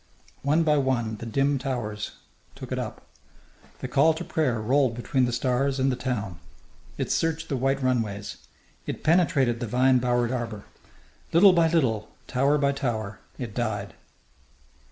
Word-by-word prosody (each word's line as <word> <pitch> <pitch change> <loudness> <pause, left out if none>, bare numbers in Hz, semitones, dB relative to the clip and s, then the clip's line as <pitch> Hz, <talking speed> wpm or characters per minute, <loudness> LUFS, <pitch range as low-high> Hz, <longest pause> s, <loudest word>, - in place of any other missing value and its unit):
One 150 +4 +2
by 150 -2 +3
one 120 -5 0
the 115 - -7
dim 135 +4 +1
towers 120 -6 -4 0.4
took - - -9
it - - -1
up. - - -6 0.8
The - - -3
call 155 +3 +4
to - - -5
prayer 130 -8 0
rolled 125 +2 +2
between 125 +2 +1
the 120 - -1
stars 130 +3 0
and 135 +1 +2
the - - -1
town. 110 -9 -3 0.6
It - - -2
searched 160 0 0
the 140 - 0
white 135 +1 0
runways. 110 -6 -1 0.5
It - - -5
penetrated 155 -8 +3
the 120 - -3
vine 130 +3 +3
bowered 120 -1 +1
arbour. 115 -5 -4 0.7
Little 185 +3 +7
by 170 -2 +4
little, 125 -10 +1 0.2
tower 140 +3 +2
by 140 -1 +2
tower, 115 -6 -3 0.2
it 120 -5 -6
died. 110 -3 -3
130 Hz, 155 wpm, -26 LUFS, 115-140 Hz, 0.8 s, Little